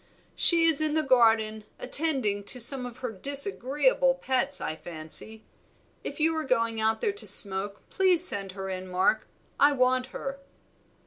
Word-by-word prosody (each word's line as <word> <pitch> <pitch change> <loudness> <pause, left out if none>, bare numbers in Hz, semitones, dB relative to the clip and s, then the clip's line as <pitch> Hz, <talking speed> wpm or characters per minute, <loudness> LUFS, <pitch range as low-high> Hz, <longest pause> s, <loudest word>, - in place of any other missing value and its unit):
"She 335 -1 +2
is 325 -2 +5
in 310 -1 -1
the 315 - 0
garden, 225 -5 +1
attending 260 -11 0
to 250 - +2
some 250 +1 +4
of 245 -1 -13
her 245 - -4
disagreeable 295 - +1
pets, 270 - 0
I 155 - -5
fancy. 170 +7 -7 0.6
If - - -8
you 320 +1 0
are 315 - -3
going 230 -4 -2
out 220 0 -1
there 415 - -1
to 415 - -5
smoke, 200 0 +2
please 365 -2 +3
send 195 - -4
her 195 0 -8
in, 185 0 -7
Mark; 185 +4 -1 0.3
I 285 +1 +4
want 255 -1 0
her." 275 +1 -8
255 Hz, 165 wpm, -26 LUFS, 215-305 Hz, 0.6 s, is